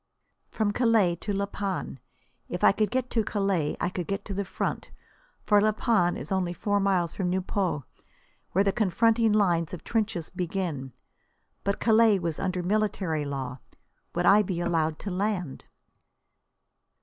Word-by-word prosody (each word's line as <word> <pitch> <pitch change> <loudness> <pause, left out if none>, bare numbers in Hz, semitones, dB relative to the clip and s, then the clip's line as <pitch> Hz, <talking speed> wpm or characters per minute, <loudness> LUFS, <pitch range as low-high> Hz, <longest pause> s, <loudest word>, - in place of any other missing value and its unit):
From 215 -2 0
Calais 220 -6 +3
to 205 - -4
La 200 0 0
Panne! 195 -8 -4 0.5
If 180 - -4
I - - +8
could 210 +1 0
get 255 +2 -2
to 225 - +2
Calais 195 -8 0
I - - 0
could 180 -2 -4
get 200 0 -3
to 200 - -5
the 200 +1 -1
front, 185 - -3 0.5
for 205 -1 +4
La 215 +1 +3
Panne 210 -6 +2
is 140 +8 -8
only 185 -2 0
four 205 +3 0
miles 190 -4 +1
from 185 -3 -1
Nieuport, 185 -4 -1 0.7
where 195 - +3
the 200 - +2
confronting 225 +2 +2
lines 180 -5 +2
of 170 - -13
trenches 215 -7 -2
begin. 175 -7 -3 0.7
But 200 0 -1
Calais 220 -2 +5
was 170 -4 -3
under 185 -2 -1
military 190 -6 0
law. 135 -2 -4 0.6
Would 175 +1 0
I 205 +4 +7
be 185 -4 -3
allowed 165 -2 0
to 200 - -4
land? 180 -5 -2
190 Hz, 160 wpm, -27 LUFS, 175-210 Hz, 0.7 s, I